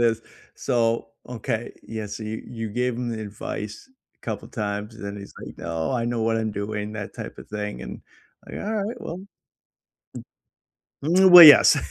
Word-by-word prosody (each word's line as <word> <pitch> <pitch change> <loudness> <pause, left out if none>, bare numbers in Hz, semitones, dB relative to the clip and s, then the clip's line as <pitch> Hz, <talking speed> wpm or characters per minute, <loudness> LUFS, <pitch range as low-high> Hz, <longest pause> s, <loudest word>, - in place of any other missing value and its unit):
is. 115 -1 +2 0.3
So, 115 -1 0 0.2
okay, 120 -1 -4
yes, 105 -2 -6
so 110 - -8
you 110 +1 -5
you 115 -3 -6
gave 125 +2 -1
him 120 -1 -3
the 110 -1 -4
advice 105 - -7 0.3
couple - - -5
times, 105 -1 -4
and 110 - -10
then 100 0 -6
he's 100 - -11
like, - - -10
"Oh, 85 +6 -3
I 120 -2 -1
know 120 -1 -1
what 115 0 +1
I'm 110 -1 -1
doing," 105 +1 -4
that 105 -2 -6
type - - -8
of - - -12
thing, 105 -11 -5
and - - -8 0.5
like, - - -9
"Alright, 215 +3 -3
well" 170 - -6 1.8
Mm, 185 +5 +4
well, 180 -1 +12
yes, 150 -3 +9
110 Hz, 170 wpm, -24 LUFS, 105-125 Hz, 1.8 s, well